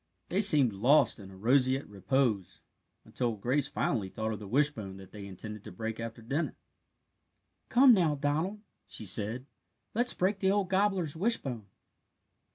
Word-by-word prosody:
They 190 Hz, +3 st, +1 dB
seemed 145 Hz, -, +5 dB
lost 125 Hz, +7 st, +4 dB
in 95 Hz, -2 st, -11 dB
a 95 Hz, -, -13 dB
roseate 130 Hz, +5 st, +2 dB
repose, 100 Hz, -2 st, -1 dB, 0.4 s
until 120 Hz, -3 st, -2 dB
Grace 130 Hz, +7 st, 0 dB
finally 100 Hz, -8 st, -1 dB
thought 110 Hz, +3 st, -3 dB
of 105 Hz, -, -6 dB
the 105 Hz, -, -9 dB
wishbone 115 Hz, -6 st, 0 dB
that 95 Hz, -1 st, -13 dB
they 100 Hz, -2 st, -9 dB
intended 105 Hz, +2 st, -8 dB
to -, -, -8 dB
break 115 Hz, 0 st, -5 dB
after 115 Hz, 0 st, -6 dB
dinner. 140 Hz, +8 st, -2 dB, 1.1 s
"Come, 255 Hz, 0 st, +7 dB
now, 170 Hz, -7 st, +3 dB
Donald," 155 Hz, +9 st, -1 dB, 0.3 s
she 110 Hz, -, -5 dB
said, 110 Hz, +6 st, -2 dB, 0.5 s
"let's 240 Hz, +3 st, +2 dB
break 195 Hz, +2 st, 0 dB
the 190 Hz, -, +2 dB
old 195 Hz, -2 st, +1 dB
gobbler's 190 Hz, -5 st, +1 dB
wishbone." 140 Hz, -, -1 dB
130 Hz, 155 wpm, -30 LUFS, 105-170 Hz, 1.1 s, Come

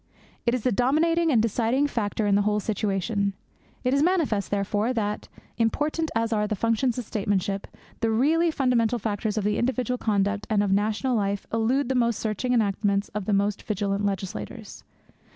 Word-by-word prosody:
It 235 Hz, -, +3 dB
is 245 Hz, -, -3 dB
the 255 Hz, -, +2 dB
dominating 320 Hz, +9 st, +2 dB
and 240 Hz, -, +4 dB
deciding 230 Hz, +5 st, +1 dB
factor 220 Hz, -5 st, -1 dB
in 205 Hz, -, +2 dB
the 200 Hz, -, +4 dB
whole 210 Hz, +1 st, +1 dB
situation. 200 Hz, -1 st, -1 dB, 0.5 s
It 250 Hz, 0 st, +1 dB
is 280 Hz, -, +3 dB
manifest, 310 Hz, -, +1 dB
therefore, 205 Hz, +4 st, 0 dB
that, 210 Hz, -3 st, -2 dB, 0.3 s
important 300 Hz, +8 st, 0 dB
as 225 Hz, 0 st, +1 dB
are 210 Hz, -1 st, +1 dB
the 215 Hz, -, -1 dB
functions 230 Hz, +4 st, +1 dB
of 245 Hz, -, -3 dB
statesmanship, 200 Hz, -2 st, -1 dB, 0.3 s
the 230 Hz, -, +1 dB
really 310 Hz, +9 st, +3 dB
fundamental 250 Hz, -6 st, +1 dB
factors 215 Hz, -1 st, -2 dB
of 210 Hz, -, 0 dB
individual 250 Hz, +3 st, 0 dB
conduct 205 Hz, -1 st, 0 dB
and 210 Hz, -2 st, +2 dB
of 200 Hz, -, 0 dB
national 215 Hz, +6 st, +1 dB
life 200 Hz, -2 st, -1 dB
elude 235 Hz, +4 st, +1 dB
the 265 Hz, -, 0 dB
most 235 Hz, -3 st, +1 dB
searching 220 Hz, +3 st, -2 dB
enactments 200 Hz, -3 st, +1 dB
of 210 Hz, -2 st, -4 dB
the 210 Hz, -, 0 dB
most 200 Hz, +1 st, +1 dB
vigilant 205 Hz, -1 st, -2 dB
legislators. 190 Hz, -, -4 dB
220 Hz, 170 wpm, -25 LUFS, 205-250 Hz, 0.5 s, and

